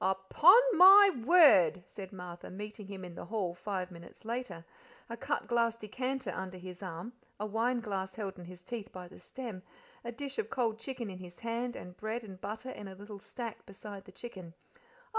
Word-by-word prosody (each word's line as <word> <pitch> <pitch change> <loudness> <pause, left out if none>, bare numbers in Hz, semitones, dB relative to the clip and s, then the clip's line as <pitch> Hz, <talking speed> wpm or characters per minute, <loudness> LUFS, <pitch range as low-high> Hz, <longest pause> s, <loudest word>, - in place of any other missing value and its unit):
"Up_on_ 190 - +6 0.2
my 390 +3 +10
word!" 220 - +7
said 190 -1 -9
Martha, 180 -2 -8
meeting 210 +1 -7
him 195 -2 -7
in 175 - -9
the - - -8
hall 190 -3 -2
five 185 0 -4
minutes 170 +4 -13
later, 230 -8 -4 0.5
a - - -2
cut - - -2
glass 235 -1 +2
decanter 255 +5 -3
under 185 0 -5
his 180 0 -9
arm, 185 +5 -6 0.3
a 210 - -2
wineglass 215 -3 -1
held 195 -4 -5
in 175 - -9
his 180 0 -12
teeth 225 0 -6
by 180 -1 -8
the 180 - -14
stem, 225 -1 -7 0.4
a 235 - -4
dish 275 - -6
of 445 - -1
cold 230 -4 0
chicken 240 -4 -5
in 185 - -8
his 175 -1 -11
hand, 235 +1 -2
and 180 0 -9
bread 220 +2 -3
and 190 -3 -10
butter 220 +5 -5
in 205 - -8
a 190 - -9
little 205 +1 -9
stack 225 +2 -7
beside 200 0 -9
the - - -13
chicken. 185 -8 -9
205 Hz, 190 wpm, -32 LUFS, 185-235 Hz, 0.5 s, my